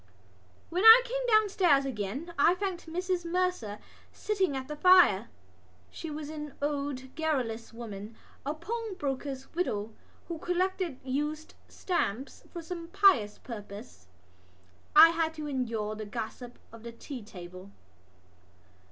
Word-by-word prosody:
When 360 +4 0
I 450 +2 +11
came - - -3
downstairs 385 - +4
again 265 - -4
I 350 - +5
found 380 -2 -3
Mrs 360 +2 -2
Mercer 345 - -1 0.3
sitting 380 -9 -1
at 260 0 -6
the 300 - -5
fire. 340 - +6 0.6
She 325 - -7
was 300 0 -6
an 300 -2 -7
old 280 -3 -3
garrulous 255 -8 -2
woman, 220 -2 -8 0.3
a 290 +3 -3
pawnbroker's 310 - -4
widow, 220 - -2 0.3
who 335 -2 -5
collected 360 -4 -1
used 295 +4 -3
stamps 270 - -3
for 340 -2 -7
some 335 0 -6
pious 330 - +4
purpose. 205 - -10 0.9
I 320 +2 +10
had 325 -1 -1
to 305 -1 -5
endure 230 -6 -2
the 215 -1 -7
gossip 240 +2 -6
of 230 0 -12
the 235 +1 -8
tea 255 +2 -8
table. 185 -1 -11
295 Hz, 125 wpm, -29 LUFS, 230-355 Hz, 0.9 s, I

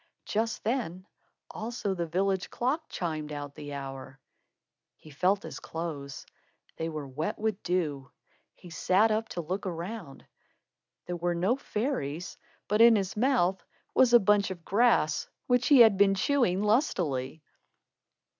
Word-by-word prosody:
Just 225 +2 -2
then 210 -6 -2 0.5
also 220 -3 -3
the 170 -2 -3
village 190 +3 0
clock 290 +6 -2
chimed 155 -4 -4
out 145 -1 -6
the 145 -1 -8
hour. 135 -1 -8 0.8
He 155 - -15
felt 185 +8 +1
his - - -7
clothes. 150 -4 -6 0.5
They 165 0 -2
were 155 -3 -5
wet 145 +5 -3
with 215 -2 -2
dew. 150 -7 -2 0.5
He 175 - -14
sat 195 +6 +3
up 220 +1 -1
to 175 - -4
look 185 +5 -4
around. 175 -3 -6 0.8
There 175 0 -4
were 175 0 -1
no 190 +8 +2
fairies, 210 - -3 0.3
but 210 +2 +2
in 230 0 +8
his 195 -2 -1
mouth 210 -6 +1 0.3
was 255 -2 +5
a 240 - +8
bunch 205 0 +3
of 175 -3 -8
grass 205 -8 +2 0.2
which 245 -1 +2
he 280 -4 +7
had 220 -4 +7
been 195 -1 +5
chewing 200 -4 +1
lustily. 160 - 0
185 Hz, 145 wpm, -29 LUFS, 160-220 Hz, 0.8 s, in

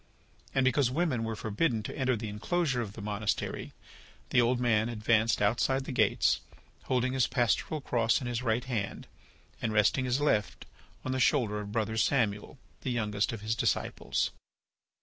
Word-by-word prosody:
And 135 -1 +3
because 130 0 +3
women 135 -4 0
were 115 0 -3
forbidden 110 +2 -1
to - - -6
enter 130 -2 +1
the 110 0 -5
enclosure 130 +6 -1
of 105 -4 -5
the 105 - -8
monastery 105 0 -2 0.6
the 120 - +5
old 120 +1 +2
man 115 -2 +2
advanced 110 -1 +2
outside 130 +5 +2
the 135 - -6
gates, 110 -5 +2 0.5
holding 130 0 +1
his 130 -2 +2
pastoral 125 +5 0
cross 115 -3 +1
in 130 - -6
his 120 0 -2
right 120 0 0
hand 115 -7 -3 0.6
and 115 - -1
resting 110 +5 +3
his 125 +2 +1
left 110 -9 0 0.4
on 130 - -1
the 130 - -1
shoulder 120 -5 +2
of 105 0 -6
Brother 110 0 -1
Samuel, 110 -1 0 0.2
the - - -3
youngest 105 -4 0
of 115 -3 -6
his 110 +1 -1
disciples. 115 - -1
115 Hz, 170 wpm, -30 LUFS, 110-130 Hz, 0.6 s, the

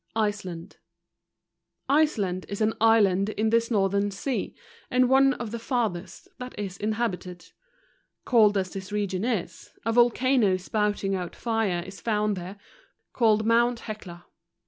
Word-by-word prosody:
Iceland. 205 -5 -3 1.1
Iceland 215 -12 +1
is 200 - -5
an 220 0 +2
island 205 -3 +4
in 215 +1 -1
this 230 0 +2
northern 200 -2 +1
sea, 235 +6 -3 0.3
and 255 0 +3
one 270 +1 +4
of 235 -3 -6
the 235 - -4
farthest 210 -8 -3
that 250 0 -8
is 195 -3 -4
inhabited. 210 -5 -3 0.7
Cold 215 -4 +4
as 185 -1 -2
this 190 0 -7
region 200 -2 -2
is, 195 -8 -4
a 230 - +1
volcano 240 -3 +3
spouting 205 +1 -1
out 180 -2 -4
fire 220 -7 -1
is 190 -2 -11
found 210 0 0
there, 185 +2 -7 0.6
called 220 -3 +3
mount 235 +1 +2
Hecla. 180 -6 -8
210 Hz, 135 wpm, -26 LUFS, 190-230 Hz, 1.1 s, island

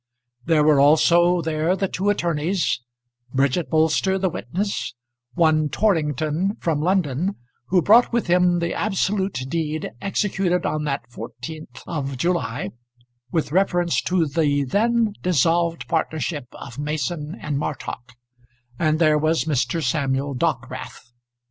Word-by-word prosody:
There 160 -2 +3
were 150 -2 +5
also 170 +4 +5
there 160 +3 0
the 195 0 -1
two 195 +2 -1
attorneys, 170 -4 0 0.5
Bridget 140 +5 +1
Bolster 160 +4 +2
the 190 -2 0
witness, 165 - -3 0.4
one 155 -3 +3
Torrington 160 - 0
from 155 -3 -1
London 180 0 0 0.3
who 180 -2 +3
brought 230 +4 +6
with 235 -1 0
him 180 0 +3
the 170 0 -1
absolute 195 -5 -1
deed 155 0 -2
executed 190 -2 0
on 155 0 -1
that 140 -5 -3
14th 125 +7 -9
of 140 -5 -4
July 125 - -1 0.6
with 160 -4 -1
reference 175 -1 +2
to 180 -2 +1
the 145 -1 +1
then 225 - +1
dissolved 170 0 +1
partnership 155 -4 -2
of 120 - -10
Mason 150 +2 -3
and 145 -2 -2
Martock; 125 -4 -5 0.7
and 155 -1 +2
there 155 -2 +4
was 160 +2 +1
Mr. 160 +3 0
Samuel 140 -2 0
Dockwrath. 125 -1 -3
160 Hz, 125 wpm, -22 LUFS, 145-180 Hz, 0.7 s, brought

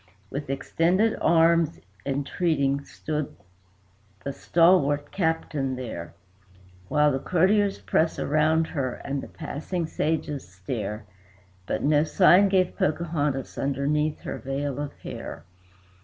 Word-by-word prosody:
With 140 0 -5
extended 175 +10 +1
arms, 165 - +4 0.3
entreating, 140 0 0
stood 150 -1 -4 0.9
the 140 - -3
stalwart 145 -4 +3
Captain 160 -6 -1
there, 85 -11 -6 0.7
While 150 +7 +3
the 135 - -1
courtiers 195 +6 +2
press 160 0 +1
around 155 +2 +2
her, 135 -6 -2
and 140 0 -2
the - - -8
passing 165 +3 -4
pages 150 - -2
stare; 105 +3 -5 0.6
But - - -2
no 150 +1 +4
sign 185 +4 +5
gave 185 -2 +2
Pocahontas 150 -4 -1
underneath 145 +3 0
her - - -5
veil 140 0 -3
of 145 -1 -3
hair. - - -7
150 Hz, 110 wpm, -26 LUFS, 140-165 Hz, 0.9 s, sign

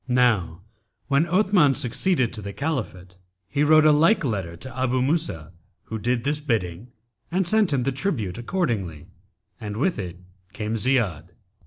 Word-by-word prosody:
Now 110 -9 +1 0.5
when 140 +4 +3
Othman 180 -6 +3
succeeded 135 0 0
to 110 - -6
the 100 0 -6
Caliphate, 105 - -4 0.3
he 145 +6 0
wrote 155 +1 +6
a 155 - +7
like 165 +8 +4
letter 95 -8 -3
to 125 +9 -9
Abu 130 0 0
Musa, 125 - -1 0.3
who 110 - -6
did 120 +3 -1
his 150 +1 0
bidding 110 - -2 0.4
and 185 +1 0
sent 215 -3 +3
him 135 -3 +1
the 135 - 0
tribute 125 - -2
accordingly, 115 - -2 0.5
and 105 -1 -6
with 150 - 0
it 90 -2 -6 0.3
came 110 0 -3
Ziyád. 110 - 0
125 Hz, 155 wpm, -24 LUFS, 100-150 Hz, 0.5 s, a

